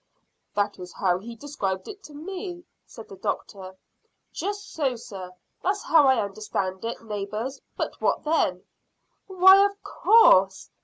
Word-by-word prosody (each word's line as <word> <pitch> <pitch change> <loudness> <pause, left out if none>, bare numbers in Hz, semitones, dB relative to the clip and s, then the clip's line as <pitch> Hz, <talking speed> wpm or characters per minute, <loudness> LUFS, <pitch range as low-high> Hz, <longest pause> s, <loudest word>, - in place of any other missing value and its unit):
"That 205 -1 -1
is 180 -1 -9
how 180 -2 +1
he 230 +4 -9
described 220 -8 -4
it 405 -1 -9
to 295 - -12
me," 355 +2 -7 0.2
said - - -12
the - - -12
doctor. 190 -2 -5 0.6
"Just 405 0 -5
so, 275 -5 0
sir. 195 -5 -9 0.3
That's 400 +2 -1
how 310 -4 +5
I 260 -3 +4
understand 195 -2 -4
it, 230 0 -5
neighbours; 215 +5 -5 0.2
but - - -4
what - - +1
then?" 300 - 0 0.6
"Why, 380 +1 +7
of 405 0 -2
course!" 195 - +4
240 Hz, 145 wpm, -25 LUFS, -, 0.6 s, Why